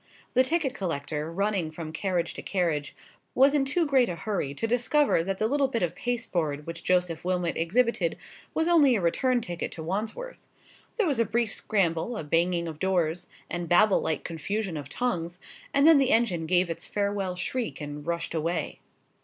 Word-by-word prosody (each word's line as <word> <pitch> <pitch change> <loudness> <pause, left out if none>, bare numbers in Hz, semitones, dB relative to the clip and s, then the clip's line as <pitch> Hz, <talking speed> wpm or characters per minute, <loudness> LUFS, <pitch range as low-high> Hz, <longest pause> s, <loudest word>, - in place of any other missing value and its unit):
The 255 - +5
ticket 280 0 0
collector, 155 - -3
running 195 -2 0
from 155 0 -7
carriage 175 0 -1
to - - -7
carriage, 165 -6 -1 0.4
was 275 +2 +5
in 285 -2 +2
too 325 +5 +1
great 265 -4 +3
a 175 - -3
hurry 165 -6 -3
to 225 - -2
discover 245 - +2
that 190 +2 -2
the 215 - 0
little 280 +4 +2
bit 230 -6 -1
of 175 -1 0
pasteboard 175 - -2
which 165 0 -7
Joseph 180 -3 +1
Wilmot 180 -1 0
exhibited 235 - +1 0.4
was 320 +1 +1
only 300 -7 +5
a - - +1
return 245 +8 +1
ticket 175 -5 -4
to 160 - -7
Wandsworth. 215 - -4 0.6
There 445 - +1
was 285 -7 0
a - - +5
brief 230 +1 0
scramble, 195 +2 0
a - - -4
banging 170 +3 +1
of 155 -2 -7
doors, 175 -3 0 0.2
and 175 -1 -4
Babel 200 +3 +5
like 155 - -1
confusion 185 +3 -3
of 145 -2 -6
tongues; 180 -8 -2 0.3
and 280 +1 +3
then 320 -3 +8
the 270 -2 +3
engine 190 -10 +2
gave 180 0 +2
its 165 - -6
farewell 200 -2 -1
shriek 235 +6 -3
and 145 -1 -6
rushed 170 +1 -3
away. 165 0 -2
185 Hz, 185 wpm, -27 LUFS, 165-240 Hz, 0.6 s, then